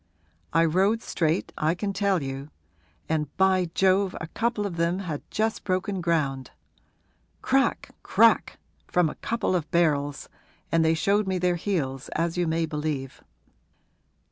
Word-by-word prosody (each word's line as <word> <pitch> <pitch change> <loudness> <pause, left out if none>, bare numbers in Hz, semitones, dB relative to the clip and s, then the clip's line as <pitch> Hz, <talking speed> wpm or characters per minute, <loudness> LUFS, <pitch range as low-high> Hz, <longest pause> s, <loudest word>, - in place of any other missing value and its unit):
I 165 - +4
rode 195 +7 +2
straight, 165 +1 -1
I 155 +3 +2
can 200 +2 -3
tell 195 -5 +1
you; 135 +2 -5 0.6
and, 155 -1 0
by 190 -2 +3
Jove, 190 0 +3
a - - -4
couple 225 +4 -1
of 180 -4 -4
them 170 +2 +1
had 170 -7 -4
just 220 +1 -1
broken 185 0 -1
ground! 145 -6 0 0.9
Crack 270 +1 +1
crack, - - +3 0.3
from 175 -4 +2
a - - -15
couple 230 -5 0
of 165 -3 -2
barrels, 145 -5 +1 0.4
and 165 0 +3
they 160 0 +3
showed 200 +5 +1
me 190 -1 0
their 180 0 +1
heels, 145 -8 -2
as 165 +1 0
you 175 -1 0
may 165 +1 +1
believe. 150 -4 -4
170 Hz, 145 wpm, -26 LUFS, 155-195 Hz, 0.9 s, I